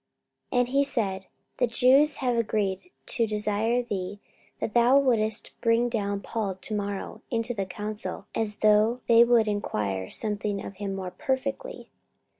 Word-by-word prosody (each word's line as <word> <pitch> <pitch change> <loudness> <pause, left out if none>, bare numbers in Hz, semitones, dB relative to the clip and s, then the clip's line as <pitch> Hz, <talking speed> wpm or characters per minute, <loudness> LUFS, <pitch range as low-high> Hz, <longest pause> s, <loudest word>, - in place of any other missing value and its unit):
44:023:020 245 - +2
And 245 - +2
he 275 +2 +3
said, 195 -8 -2 0.3
The 245 - +2
Jews 270 +5 +4
have 250 -2 -1
agreed 210 - -1 0.2
to 230 -2 +1
desire 215 +3 0
thee 200 -3 -4 0.4
that 215 - -3
thou 240 +3 +5
wouldest 225 -5 +2
bring 230 +1 +2
down 200 -3 -2
Paul 205 -4 -3
to 190 +4 -4
morrow 200 -1 -4
into 230 0 -1
the 195 -4 -3
council, 210 +3 -6
as 215 -2 -1
though 215 +4 +3
they 235 0 +7
would 235 -2 +3
enquire 100 - -2
somewhat 210 -2 0
of 195 - -9
him 200 -1 -4
more 185 -2 -5
perfectly. 275 - -4
220 Hz, 155 wpm, -26 LUFS, 205-245 Hz, 0.4 s, they